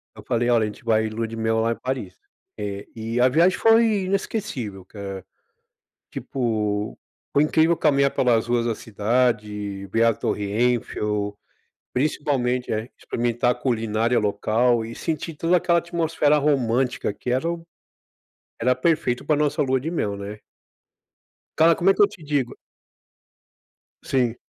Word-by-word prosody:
Eu - - -12
falei, 120 +1 0
olha, 115 -2 +4
a - - +2
gente 105 - -10
vai 110 -1 +2
lua 115 +1 -3
de 115 - -7
mel 110 0 +1
lá 115 +1 +1
em - - -1
Paris, 125 -4 -5 0.4
eh, 100 -1 -5
e 115 +2 -3
a 130 - +6
viagem 170 +7 +3
foi 225 -3 +4
inesquecível, 185 - -3
cara. 100 -2 -7 0.9
Tipo, 105 -4 -2 0.3
foi 145 - +4
incrível 160 +2 +3
caminhar 140 -2 +3
pelas 120 -2 +2
ruas 120 -1 +1
da 115 -2 0
cidade. 105 -3 -1
Ver 115 +5 +1
a 115 -1 +4
Torre 105 - -2
Eiffel, 105 -3 0 0.6
principalmente, 125 -2 0
eh, 110 +1 -1
e 125 - -19
experimentar 120 +1 0
a - - +1
culinária 115 -1 0
local 110 +3 +1
e 115 +1 -7
sentir 160 0 -3
toda 165 +4 +2
aquela 170 -1 +3
atmosfera 165 -3 +1
romântica, 130 -5 +1
que 120 - -6
era 135 +7 +1
o 170 -1 -6 0.9
era 125 +2 +2
perfeito 130 -2 0
para 150 - +3
a - - -2
nossa 150 +1 0
lua 130 -2 +1
de 160 +4 -3
mel, 105 -12 -1
né? 100 +1 -7 1.2
Cara, 165 +1 +5
como 185 +3 +2
é - - +6
que 205 - +1
eu 205 - +7
te 165 - -14
digo? 145 -4 -1 1.5
Sim. 125 -3 +1
120 Hz, 155 wpm, -23 LUFS, 110-150 Hz, 1.5 s, eu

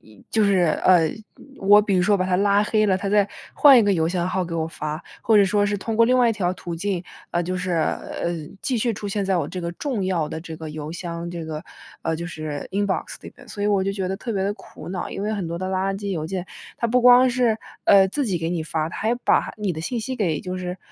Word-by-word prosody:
一 110 -2 -19
就 220 - +2
是， 190 -4 +3 0.2
呃， 170 -4 +5 0.5
我 205 +2 +6
比 200 -2 0
如 180 - +3
说 205 +1 +3
把 185 - 0
它 185 -1 0
拉 200 +1 +3
黑 215 0 +2
了， 190 -2 +3
它 195 +1 -3
再 205 -1 +3 0.2
换 275 -4 +7
一 - - +5
个 205 -1 +3
邮 165 -2 +1
箱 175 0 -1
号 185 0 -1
给 165 - -6
我 160 -1 -1
发， 155 0 -5 0.2
或 220 - +4
者 200 - +7
说 205 +1 +2
是 205 0 0
通 225 +3 -4
过 230 - +6
另 255 +1 +3
外 245 -2 +4
一 - - +1
条 190 -5 -1
途 175 -2 -6
径， 185 0 -2 0.3
呃， 175 - +1
就 185 +2 -3
是 180 0 -2
呃， 170 +1 -1 0.3
继 250 -4 0
续 235 +2 +1
出 205 - -6
现 200 +1 -1
在 190 -1 +1
我 170 - 0
这 185 - -5
个 170 0 -3
重 235 - -3
要 175 -5 0
的 160 - -5
这 160 -1 -8
个 160 -1 -7
邮 150 0 -6
箱 170 -1 -5
这 170 -2 -5
个， 155 -1 -5 0.4
呃， 165 - 0
就 170 +1 -5
是 155 -4 -5
Inbox 200 0 -1
里 - - -9
面， - - -15
所 205 - -8
以 - - +2
我 200 -2 +2
就 195 - 0
觉 190 -2 -3
得 190 - -2
特 230 +2 -5
别 195 -2 -1
地 200 - 0
苦 205 - -12
恼， 180 -1 -4
因 - - -5
为 210 - -1
很 195 -4 -3
多 170 +1 -4
的 185 - -3
垃 190 +1 0
圾 200 0 -4
邮 165 -5 -2
件， 185 0 -4 0.3
它 235 - +1
不 250 +2 +2
光 250 +1 +7
是， 240 -3 +1 0.3
呃， 195 -1 +7
自 285 +8 -1
己 190 -7 -1
给 165 0 -2
你 170 -2 -1
发， 160 0 -2
它 - - -8
还 225 +2 0
把 245 - +1
你 205 -3 -1
的 160 - -5
信 235 +8 -2
息 260 +4 -4
给 165 -8 0
就 185 0 -5
是 180 0 -5
190 Hz, 305 characters per minute, -23 LUFS, 170-205 Hz, 0.5 s, 换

